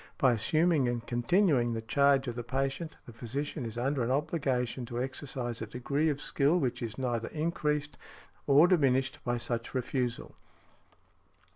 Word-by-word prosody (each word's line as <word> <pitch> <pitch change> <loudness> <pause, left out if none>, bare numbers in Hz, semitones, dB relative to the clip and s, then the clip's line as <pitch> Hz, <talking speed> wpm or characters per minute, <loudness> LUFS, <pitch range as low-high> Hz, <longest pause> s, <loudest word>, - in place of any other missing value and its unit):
By 130 -2 +4
assuming 155 +5 +2
and 120 -1 -3
continuing 120 - +2
the 115 - -3
charge 140 +2 +3
of 120 - -2
the 120 0 -5
patient, 135 +6 -2
the 120 - -11
physician 130 +3 -4
is 115 +1 -7
under 135 +2 0
an 120 - 0
obligation 130 -3 0
to 120 -1 -4
exercise 125 -2 -4
a 110 - -4
degree 140 +7 0
of 145 -2 -1
skill 145 +4 +2
which 130 -6 -1
is 115 -3 -4
neither 120 -3 -1
increased 150 -2 -2 0.5
or 145 +4 +7
diminished 135 -7 +2
by 120 0 0
such 120 +1 -4
refusal. 125 -1 -2
130 Hz, 155 wpm, -30 LUFS, 120-145 Hz, 0.5 s, or